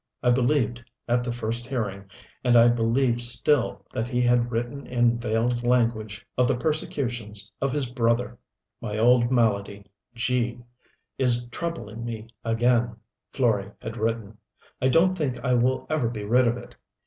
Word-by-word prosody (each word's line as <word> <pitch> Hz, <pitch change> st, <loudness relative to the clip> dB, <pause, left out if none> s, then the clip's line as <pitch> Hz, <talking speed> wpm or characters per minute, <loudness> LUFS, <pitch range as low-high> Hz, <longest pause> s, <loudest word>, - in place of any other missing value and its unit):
I 125 Hz, -, +4 dB
believed, 120 Hz, -2 st, +1 dB, 0.2 s
at 120 Hz, 0 st, +2 dB
the 120 Hz, -, -2 dB
first 120 Hz, +1 st, -4 dB
hearing, 105 Hz, -7 st, -3 dB, 0.4 s
and 120 Hz, -1 st, +5 dB
I 120 Hz, +1 st, +7 dB
believed 120 Hz, +1 st, +2 dB
still 120 Hz, -4 st, +1 dB
that 115 Hz, -, -2 dB
he 120 Hz, 0 st, -1 dB
had 120 Hz, -1 st, +2 dB
written 120 Hz, +4 st, -3 dB
in 120 Hz, -1 st, +2 dB
veiled 120 Hz, +1 st, 0 dB
language 115 Hz, -4 st, 0 dB
of 125 Hz, -, +4 dB
the -, -, +2 dB
persecutions 120 Hz, -7 st, -2 dB
of 135 Hz, 0 st, +1 dB
his 145 Hz, 0 st, -1 dB
brother: 120 Hz, 0 st, 0 dB, 0.4 s
"My 105 Hz, -3 st, -4 dB
old 120 Hz, +1 st, +4 dB
malady, 100 Hz, -5 st, 0 dB, 0.3 s
G 120 Hz, 0 st, -1 dB, 0.6 s
is 120 Hz, -2 st, +3 dB
troubling 115 Hz, -8 st, -5 dB
me 115 Hz, -2 st, -5 dB, 0.2 s
again," 120 Hz, 0 st, +2 dB, 0.4 s
Florey 105 Hz, -6 st, 0 dB
had 110 Hz, -, -6 dB
written. 110 Hz, -2 st, -3 dB, 0.4 s
"I 130 Hz, -, +3 dB
don't 170 Hz, +7 st, +4 dB
think 145 Hz, -8 st, -2 dB
I 125 Hz, -, +2 dB
will 125 Hz, +2 st, +1 dB
ever 155 Hz, -7 st, 0 dB
be 110 Hz, -3 st, -5 dB
rid 120 Hz, +4 st, +3 dB
of 120 Hz, +1 st, +1 dB
it. 120 Hz, -, -11 dB
120 Hz, 155 wpm, -25 LUFS, 115-125 Hz, 0.6 s, I